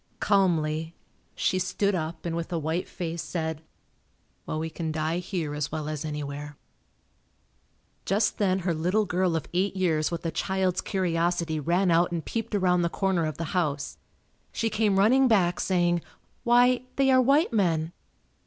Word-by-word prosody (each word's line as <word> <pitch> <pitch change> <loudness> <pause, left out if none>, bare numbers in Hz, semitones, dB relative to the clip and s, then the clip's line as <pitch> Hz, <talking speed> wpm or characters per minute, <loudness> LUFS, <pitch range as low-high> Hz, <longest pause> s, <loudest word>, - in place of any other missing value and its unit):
Calmly, 165 -5 +1 0.4
she 185 - +1
stood 185 +2 0
up 165 -1 -4
and 165 -1 -2
with 170 +1 -4
a 170 - 0
white 160 +3 -2
face 170 -1 -4
said. 160 -2 -3 0.9
"Well - - -2
we 160 +1 -3
can 160 -1 -3
die 155 +2 -1
here 175 -5 -3
as 150 -1 -3
well 155 -1 -3
as 155 -1 -4
anywhere." 145 -1 -5 1.5
Just 205 +3 0
then 190 -2 +2
her 175 - +2
little 180 +7 +1
girl 180 -2 0
of 160 - -2
eight 190 +3 0
years 160 -5 +1
with 170 0 -5
a 165 - 0
child's 190 -1 0
curiosity 170 -3 0
ran 175 +5 +2
out 170 +1 +3
and 165 -3 -3
peeped 225 -2 -3
around 180 -2 +3
the 170 - +1
corner 185 -3 0
of 155 - -5
the 165 - -4
house. 145 -5 -1 0.5
She 225 -1 -1
came 210 -3 +2
running 255 +7 +5
back 185 -7 +2
saying, 175 -2 +1 0.4
"Why, 245 +1 +4
they 270 -1 +3
are 260 0 +6
white 280 +3 +3
men." 170 -5 +1
175 Hz, 165 wpm, -27 LUFS, 160-195 Hz, 1.5 s, are